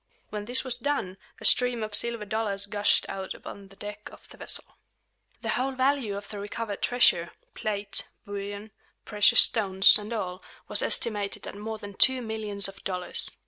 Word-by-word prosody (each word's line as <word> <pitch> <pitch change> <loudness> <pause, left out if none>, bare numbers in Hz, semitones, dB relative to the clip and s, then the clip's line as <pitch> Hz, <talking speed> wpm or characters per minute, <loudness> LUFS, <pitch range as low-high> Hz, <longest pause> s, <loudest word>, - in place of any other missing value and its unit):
When 210 -1 -5
this 250 +3 +1
was 255 -2 -1
done, 240 -8 -2 0.2
a - - -7
stream 245 -3 +4
of 215 -1 -5
silver 230 0 -1
dollars 205 -2 -1
gushed 205 0 +2
out 190 -1 -5
upon 200 -1 -10
the 195 - -18
deck 210 +1 -8
of - - -16
the - - -15
vessel. - - -1 0.8
The - - -4
whole 265 +2 0
value 260 -5 0
of 200 - -8
the 205 - -7
recovered 205 0 -5
treasure, 175 -8 +3 0.2
plate, 205 -1 -2 0.2
bullion, 205 +1 -6 0.3
precious 210 -2 +6
stones, 195 -3 +6
and 210 +2 -8
all, 185 -5 -4 0.3
was - - +3
estimated 205 -3 0
at - - -7
more 220 +2 -5
than 205 -2 -9
two 260 +5 +4
millions 215 -3 -2
of 195 0 -12
dollars. 180 -1 -1
210 Hz, 175 wpm, -27 LUFS, 200-230 Hz, 0.8 s, precious